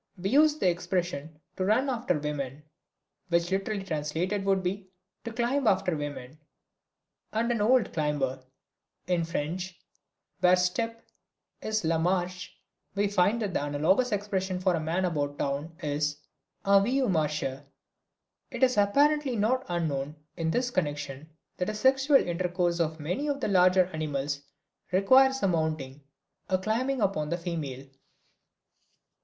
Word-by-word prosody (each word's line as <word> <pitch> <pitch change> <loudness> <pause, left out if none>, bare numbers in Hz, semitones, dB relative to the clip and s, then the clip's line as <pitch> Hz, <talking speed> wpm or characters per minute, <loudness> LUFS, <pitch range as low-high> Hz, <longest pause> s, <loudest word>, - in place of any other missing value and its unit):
We 190 +3 -2
use 300 +2 +5
the 190 - +1
expressions 175 -4 -2 0.2
"to 185 - 0
run 220 +7 +2
after 240 - 0
women," 145 -1 -4 0.7
which 170 +1 +1
literally 195 +1 -1
translated 165 +4 -2
would 195 -1 +2
be 190 +1 -3 0.4
"to 230 - -4
climb 245 +3 0
after 185 -4 +2
women," 145 -1 -6 0.9
and 230 +2 0
"an 230 -3 0
old 240 +2 +3
climber." 140 -4 -1 0.6
In 175 -2 +1
French, 170 +3 -4 0.6
where 180 0 +6
"step" 225 +6 -1 0.6
is 215 -4 -1
"la 160 0 +2
marche" 180 +1 -1 0.5
we 205 +1 +2
find 205 +4 +2
that 200 -3 -3
the - - 0
analogous 160 - +2
expression 195 -3 -1
for 185 0 +2
a 165 - 0
man 165 +4 0
about 145 -4 -2
town 145 +4 -3
is 150 0 -1 0.5
"un 200 0 +6
vieux 260 +4 +1
marcheur." 150 -6 -1 0.9
It - - -3
is 255 -3 +4
apparently 280 +6 +3
not 240 +5 +1
unknown 150 -4 -2 0.2
in 165 -1 -1
this 245 +8 0
connection 145 - -3 0.3
that 180 - -1
the 215 - -3
sexual 270 +5 +3
intercourse 175 -2 0
of 160 -1 -1
many 180 - -2
of 285 -1 -1
the - - -1
larger 185 -1 +5
animals 145 -2 -2 0.5
requires 260 +8 +5
a - - +4
mounting, 155 -5 -1 0.5
a 185 - +3
climbing 235 +7 -1
upon 190 -7 0
the 175 - -1
female. 155 -7 -5
180 Hz, 140 wpm, -28 LUFS, 155-215 Hz, 0.9 s, where